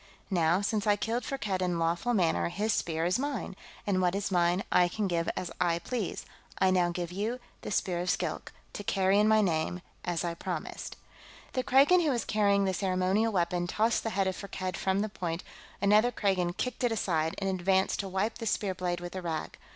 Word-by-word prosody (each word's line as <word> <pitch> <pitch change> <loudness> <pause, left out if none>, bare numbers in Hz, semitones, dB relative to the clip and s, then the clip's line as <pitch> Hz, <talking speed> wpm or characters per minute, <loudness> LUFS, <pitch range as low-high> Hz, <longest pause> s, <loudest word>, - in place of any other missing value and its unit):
Now, 170 0 +3
since 210 0 -1
I 205 - +5
killed 225 +4 -2
Firkked 210 -9 -2
in 180 -2 0
lawful 170 +9 0
manner, 170 -3 +2
his 210 +5 0
Spear 160 -1 -1
is 180 +7 +1
mine, 275 -8 -3 0.3
and 190 -2 +1
what 180 0 +2
is 200 0 -2
mine 175 +1 +2
I 180 - +5
can 205 +3 -2
give 170 -2 0
as 180 - -3
I 170 -2 +2
please. 215 +3 -3 0.3
I 190 -1 +3
now 180 -2 +3
give 175 0 -4
you 215 +7 -2 0.2
the - - -6
Spear 180 -3 0
of 180 +1 -2
Skilk, - - -2 0.2
to 205 - -6
carry 195 0 +2
in 210 - +4
my 220 0 +5
name, 170 -1 0 0.2
as 175 -1 -1
I 170 - -1
promised." 170 - -5 0.6
The 255 - +1
Kragan 280 +8 +5
who 320 - +2
was 240 -4 0
carrying 200 -2 +2
the 190 - +1
ceremonial 190 +4 +1
weapon 175 -2 0
tossed 220 +5 +1
the 225 - -2
head 195 -2 0
of 190 -1 -1
Firkked 185 -2 -4
from 190 +1 0
the 215 - 0
point; 175 -4 -4 0.4
another 210 +4 +5
Kragan 185 -5 0
kicked 250 0 -3
it 245 - +2
aside 165 -7 0
and 195 - -2
advanced 190 0 +1
to 195 - -3
wipe 200 +5 -1
the 225 - -3
spear 200 -2 0
blade 180 -1 -2
with 175 +1 -7
a 185 - -3
rag. 160 -3 -4
190 Hz, 210 wpm, -30 LUFS, 175-210 Hz, 0.6 s, I